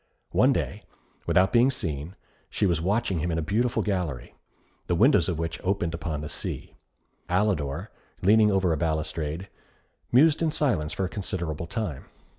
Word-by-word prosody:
One -, -, +4 dB
day, -, -, -2 dB, 0.5 s
without 95 Hz, +1 st, +3 dB
being 120 Hz, +2 st, +5 dB
seen, 85 Hz, -, -4 dB, 0.3 s
she -, -, 0 dB
was 85 Hz, -4 st, +1 dB
watching 100 Hz, 0 st, 0 dB
him 85 Hz, -, -1 dB
in 80 Hz, -, -1 dB
a -, -, 0 dB
beautiful 115 Hz, +9 st, 0 dB
gallery, 85 Hz, -, -3 dB, 0.5 s
the 90 Hz, -, +1 dB
windows 105 Hz, -, +4 dB
of 85 Hz, -, -1 dB
which 80 Hz, 0 st, -4 dB
opened 90 Hz, -3 st, 0 dB
upon 80 Hz, -2 st, -3 dB
the 75 Hz, -, -5 dB
sea; -, -, -6 dB, 0.5 s
Alidor, 90 Hz, -7 st, 0 dB, 0.3 s
leaning 105 Hz, +2 st, +6 dB
over 95 Hz, -4 st, +2 dB
a -, -, -1 dB
balustrade, 80 Hz, +2 st, -2 dB, 0.6 s
mused 150 Hz, +6 st, +5 dB
in 165 Hz, -, +2 dB
silence 125 Hz, -, 0 dB
for 95 Hz, -, -1 dB
a -, -, -1 dB
considerable 85 Hz, -5 st, -3 dB
time. 95 Hz, -, -4 dB
90 Hz, 160 wpm, -26 LUFS, 80-105 Hz, 0.6 s, leaning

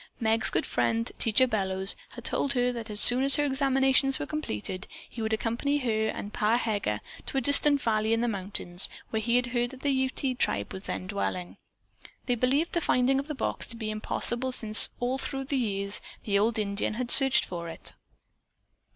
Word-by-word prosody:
Meg's 225 Hz, -1 st, +3 dB
good -, -, -1 dB
friend 230 Hz, +1 st, -1 dB
Teacher 230 Hz, +2 st, +3 dB
Bellows 190 Hz, -4 st, -1 dB
had -, -, -11 dB
told 275 Hz, -, +1 dB
her 250 Hz, -1 st, +1 dB
that 230 Hz, -2 st, -7 dB
as 210 Hz, -1 st, -1 dB
soon 245 Hz, +3 st, +6 dB
as 275 Hz, 0 st, +5 dB
her 295 Hz, -, +1 dB
examinations 270 Hz, -1 st, +2 dB
were -, -, -4 dB
completed 185 Hz, -, -5 dB, 0.2 s
he 235 Hz, -, -8 dB
would 220 Hz, 0 st, -2 dB
accompany 235 Hz, +6 st, -1 dB
her 220 Hz, -5 st, -1 dB
and 210 Hz, -1 st, -6 dB
Pa 220 Hz, +2 st, +1 dB
Heger 205 Hz, -, -2 dB, 0.3 s
to -, -, -3 dB
a -, -, +1 dB
distant 285 Hz, +2 st, +5 dB
valley 215 Hz, -1 st, 0 dB
in 225 Hz, 0 st, +1 dB
the 240 Hz, -, 0 dB
mountains 190 Hz, -3 st, -1 dB, 0.2 s
where 220 Hz, -, -1 dB
he 235 Hz, +2 st, 0 dB
had 250 Hz, 0 st, +2 dB
heard 245 Hz, 0 st, -2 dB
that 265 Hz, 0 st, -13 dB
the 285 Hz, -, 0 dB
Ute 260 Hz, -1 st, -1 dB
tribe 100 Hz, +1 st, -1 dB
was 190 Hz, -, -8 dB
then -, -, -4 dB
dwelling. 185 Hz, -2 st, -4 dB, 0.7 s
They 245 Hz, -, 0 dB
believed 265 Hz, +8 st, 0 dB
the 340 Hz, -, -1 dB
finding 265 Hz, -1 st, +1 dB
of 275 Hz, -, -6 dB
the 300 Hz, -, -5 dB
box -, -, -3 dB
to 235 Hz, -, -2 dB
be 220 Hz, -2 st, -5 dB
impossible 240 Hz, +4 st, -1 dB
since 220 Hz, -3 st, +4 dB
all 250 Hz, +2 st, -2 dB
through 270 Hz, 0 st, -4 dB
the 275 Hz, +1 st, -2 dB
years 200 Hz, -4 st, 0 dB, 0.2 s
the 200 Hz, -2 st, +1 dB
old 220 Hz, +2 st, +1 dB
Indian 205 Hz, 0 st, -2 dB
had 245 Hz, +1 st, -2 dB
searched 270 Hz, -1 st, +8 dB
for 170 Hz, -2 st, -7 dB
it. 165 Hz, -, -6 dB
235 Hz, 200 wpm, -27 LUFS, 215-265 Hz, 0.7 s, searched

